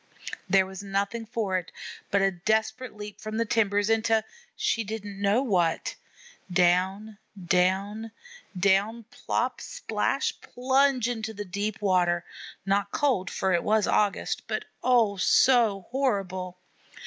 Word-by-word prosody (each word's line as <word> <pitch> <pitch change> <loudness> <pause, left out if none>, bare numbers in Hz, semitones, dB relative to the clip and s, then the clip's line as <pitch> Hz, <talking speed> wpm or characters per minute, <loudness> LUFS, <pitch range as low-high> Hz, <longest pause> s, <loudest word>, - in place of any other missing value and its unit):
There 190 0 +5
was 190 0 -8
nothing 200 +3 -2
for 210 -5 -1
it 175 - -12 0.4
but 200 -1 +2
a 195 - +3
desperate 220 +6 -1
leap 210 -1 -9
from 215 0 -5
the 230 - +1
timbers 205 -2 +1
into 225 0 +2 0.3
she 425 - 0
didn't 205 -2 -6
know 205 +6 +3
what. 175 -9 0 0.6
Down, 190 +4 +1 0.2
down, 190 +5 0 0.5
down 200 +4 +2
plop, - - -2
splash, - - -2
plunge 260 -1 +1
into 220 -2 -4
the 205 +1 -5
deep 200 +3 -3
water, 175 -3 +2 0.4
not 200 +1 +1
cold, 220 -8 0
for 190 -1 0
it 170 - +1
was 215 -1 +2
August, 205 -2 0
but - - -3 0.2
oh, 230 -5 +3
so 225 -1 +4
horrible! 190 -9 -1
205 Hz, 130 wpm, -27 LUFS, 190-225 Hz, 0.6 s, There